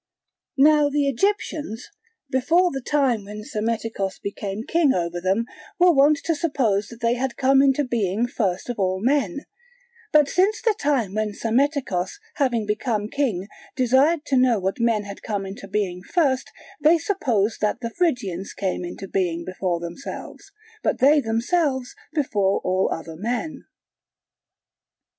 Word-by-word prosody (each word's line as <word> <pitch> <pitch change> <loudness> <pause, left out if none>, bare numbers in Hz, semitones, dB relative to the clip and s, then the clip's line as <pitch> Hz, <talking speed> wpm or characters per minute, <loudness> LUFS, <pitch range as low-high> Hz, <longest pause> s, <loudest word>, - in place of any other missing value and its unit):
Now 295 +1 +5
the 285 0 +1
Egyptians, 290 - -1 0.4
before 335 +8 +3
the 270 - -4
time 255 -5 +1
when 210 +1 -8
Psammetichos 220 -3 -2
became 200 +1 -5
king 320 -1 +2
over 175 0 -2
them, 190 +5 +1 0.3
were 360 0 +6
wont 290 +1 +5
to 335 - +2
suppose 255 - 0
that 235 +2 -12
they 230 0 +2
had 255 0 -2
come 270 0 +4
into 275 +1 +3
being 225 -3 0
first 195 -7 -2
of 245 -3 -4
all 185 -1 +1
men; 280 - +1 0.7
but 300 -2 +5
since 385 +7 +2
the 450 - +2
time 265 -9 0
when 215 0 -1
Psammetichos 235 - 0 0.2
having 245 -7 +1
become 210 0 -1
king 225 -10 -1 0.3
desired 275 +6 +3
to 275 -2 +1
know 250 -2 +4
what 190 +2 -2
men 230 -3 +2
had 200 0 -9
come 205 -3 -3
into 195 +1 -8
being 190 -3 -2
first, 265 - 0 0.3
they 315 +3 +6
suppose 250 - 0
that 210 +2 0
the 230 -1 -4
Phrygians 230 - -1
came 185 -2 -2
into 175 +2 -7
being 170 -3 -1
before 185 -2 -2
themselves, 175 - -8 0.3
but - - 0
they 290 +3 +5
themselves 260 +3 0 0.2
before 210 -11 +1
all 185 +1 +1
other 165 0 -5
men. 240 - -4
235 Hz, 150 wpm, -23 LUFS, 200-285 Hz, 0.7 s, were